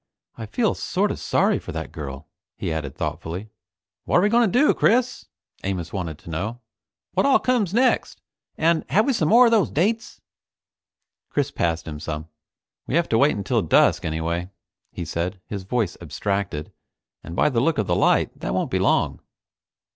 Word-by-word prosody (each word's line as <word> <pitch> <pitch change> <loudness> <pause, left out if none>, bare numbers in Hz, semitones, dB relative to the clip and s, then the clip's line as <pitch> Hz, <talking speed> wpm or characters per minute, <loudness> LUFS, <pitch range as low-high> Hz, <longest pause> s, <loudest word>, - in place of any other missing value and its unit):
I 110 -2 -7
feel 110 - +1
sort - - -1
of - - -5
sorry - - +2
for - - -8
that - - -5
girl," 75 -3 -7 0.3
he - - -2
added 75 -4 -4
thoughtfully. 95 +6 -5 0.5
"What're 175 - +3
we 205 - +4
going 230 -2 +3
to 245 - +3
do, 300 - +5
Chris?" 250 +2 +1 0.4
Amos 90 -4 -3
wanted 85 -6 -4
to 85 - -13
know. 105 +9 -3 0.5
"What - - +2
all 275 - +6
comes 240 -8 +1
next, 250 +5 +1 0.4
and 165 0 +2
have 215 +3 +3
we 275 - +2
some 155 -9 +1
more 245 +3 +7
of 235 - +4
those 220 -5 +3
dates?" 220 +8 -1 1.1
Chris 145 -1 -1
passed 85 -9 -1
him 75 -2 -6
some. 75 +1 -5 0.6
"We 130 - -1
have 170 0 +2
to 115 - +3
wait 145 +4 +4
until 100 -2 0
dusk - - +3
anyway," 85 +3 -2 0.4
he 85 - -5
said, 85 +4 -3
his 100 -3 -6
voice 110 -3 -1
abstracted, 100 -7 -3 0.5
"and 85 - -8
by - - +3
the 120 -5 +1
look 165 +4 +1
of 105 - +1
the 85 - +1
light - - +3
that - - -2
won't - - -1
be - - +1
long." - - +1
105 Hz, 180 wpm, -23 LUFS, -, 1.1 s, more